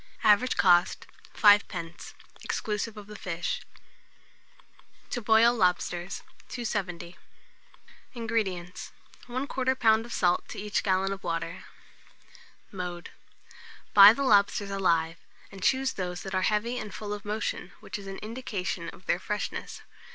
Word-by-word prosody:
Average 215 Hz, +4 st, +4 dB
cost, 175 Hz, -1 st, +4 dB, 0.3 s
5d., 185 Hz, -5 st, +3 dB, 0.3 s
exclusive 215 Hz, +1 st, -3 dB
of 210 Hz, -, -9 dB
the 210 Hz, +1 st, -11 dB
fish. 175 Hz, -4 st, -3 dB, 1.5 s
TO 245 Hz, -, -2 dB
BOIL 225 Hz, +2 st, +5 dB
LOBSTERS. 180 Hz, -2 st, 0 dB, 0.3 s
270. 185 Hz, -7 st, -4 dB, 1.0 s
INGREDIENTS. 205 Hz, -7 st, -3 dB, 0.3 s
1/4 255 Hz, +3 st, -3 dB
lb. 255 Hz, -5 st, +2 dB
of 240 Hz, -, -11 dB
salt 180 Hz, -5 st, +1 dB
to -, -, -9 dB
each 210 Hz, 0 st, -1 dB
gallon 195 Hz, 0 st, +1 dB
of 195 Hz, -, -9 dB
water. 165 Hz, +1 st, -4 dB, 1.1 s
Mode. 180 Hz, -2 st, -6 dB, 0.8 s
Buy 200 Hz, 0 st, +11 dB
the 275 Hz, +5 st, -2 dB
lobsters 205 Hz, -4 st, +3 dB
alive, 165 Hz, -4 st, +1 dB, 0.3 s
and 195 Hz, -, -11 dB
choose 265 Hz, +5 st, +2 dB
those 180 Hz, -2 st, -4 dB
that 190 Hz, -, -6 dB
are 185 Hz, -, +1 dB
heavy 230 Hz, +4 st, -1 dB
and 215 Hz, -1 st, -6 dB
full 210 Hz, -1 st, -5 dB
of 205 Hz, -, -6 dB
motion, 210 Hz, -3 st, -3 dB
which -, -, -7 dB
is 195 Hz, -, -10 dB
an 195 Hz, 0 st, -6 dB
indication 200 Hz, -7 st, -4 dB
of 180 Hz, -, -15 dB
their 175 Hz, -, +1 dB
freshness. 210 Hz, +2 st, -4 dB
200 Hz, 130 wpm, -28 LUFS, 180-220 Hz, 1.5 s, Buy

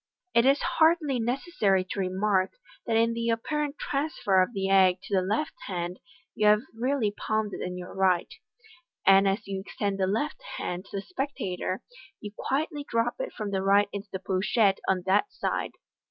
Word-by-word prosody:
It 235 Hz, +2 st, +5 dB
is 275 Hz, +1 st, +5 dB
hardly 320 Hz, -5 st, +3 dB
necessary 225 Hz, -, +1 dB
to -, -, -3 dB
remark, 190 Hz, 0 st, +1 dB, 0.3 s
that 225 Hz, -1 st, +2 dB
in 230 Hz, +1 st, +3 dB
the 230 Hz, 0 st, -1 dB
apparent 290 Hz, +5 st, -1 dB
transfer 275 Hz, -10 st, +1 dB
of 185 Hz, -, +1 dB
the 195 Hz, -4 st, -2 dB
egg 190 Hz, -2 st, +5 dB
to 200 Hz, -, -7 dB
the 190 Hz, -, +4 dB
left 215 Hz, +12 st, -1 dB
hand, 180 Hz, -1 st, -4 dB, 0.3 s
you 210 Hz, -, +2 dB
have 210 Hz, +2 st, +5 dB
really 240 Hz, -1 st, 0 dB
palmsd 215 Hz, 0 st, -2 dB
it -, -, -5 dB
in 180 Hz, 0 st, -4 dB
your 180 Hz, 0 st, -8 dB
right; 185 Hz, -2 st, +1 dB, 0.7 s
and 195 Hz, +1 st, +6 dB
as 195 Hz, +2 st, 0 dB
you 195 Hz, -1 st, -3 dB
extend 200 Hz, 0 st, -3 dB
the 190 Hz, -, +2 dB
left 290 Hz, -, -1 dB, 0.2 s
hand 180 Hz, +2 st, -4 dB
to 200 Hz, -, -6 dB
the 195 Hz, -, -4 dB
spectator, 195 Hz, -, -3 dB, 0.4 s
you 210 Hz, -, -7 dB
quietly 295 Hz, +2 st, -2 dB
drop 230 Hz, +1 st, 0 dB
it -, -, -3 dB
from 210 Hz, -2 st, -5 dB
the 190 Hz, -1 st, 0 dB
right 200 Hz, +1 st, +4 dB
into 200 Hz, 0 st, -6 dB
the -, -, -2 dB
pochette 195 Hz, +2 st, +1 dB
on 185 Hz, -2 st, +1 dB
that 200 Hz, -, +2 dB
side. -, -, -2 dB
205 Hz, 185 wpm, -27 LUFS, 190-240 Hz, 0.7 s, and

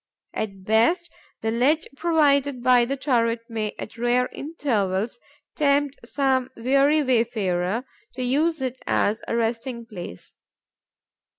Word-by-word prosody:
At 195 Hz, -3 st, -4 dB
best, 240 Hz, -, +2 dB, 0.3 s
the 225 Hz, -, 0 dB
ledge 285 Hz, +8 st, +2 dB
provided 285 Hz, -5 st, +2 dB
by 245 Hz, -1 st, +5 dB
the 275 Hz, +3 st, -2 dB
turret 235 Hz, -4 st, +1 dB
may, 220 Hz, -3 st, -3 dB
at 225 Hz, -, -8 dB
rare 245 Hz, +1 st, +2 dB
intervals, 230 Hz, -, -2 dB, 0.4 s
tempt 285 Hz, -2 st, +1 dB
some 260 Hz, -1 st, +1 dB
weary 275 Hz, +5 st, +3 dB
wayfarer 225 Hz, -4 st, 0 dB, 0.3 s
to 255 Hz, -, -3 dB
use 295 Hz, +4 st, +1 dB
it 255 Hz, 0 st, -4 dB
as 215 Hz, +2 st, +1 dB
a -, -, -1 dB
resting 235 Hz, +1 st, -2 dB
place. 175 Hz, -, -9 dB
245 Hz, 120 wpm, -24 LUFS, 225-280 Hz, 0.4 s, by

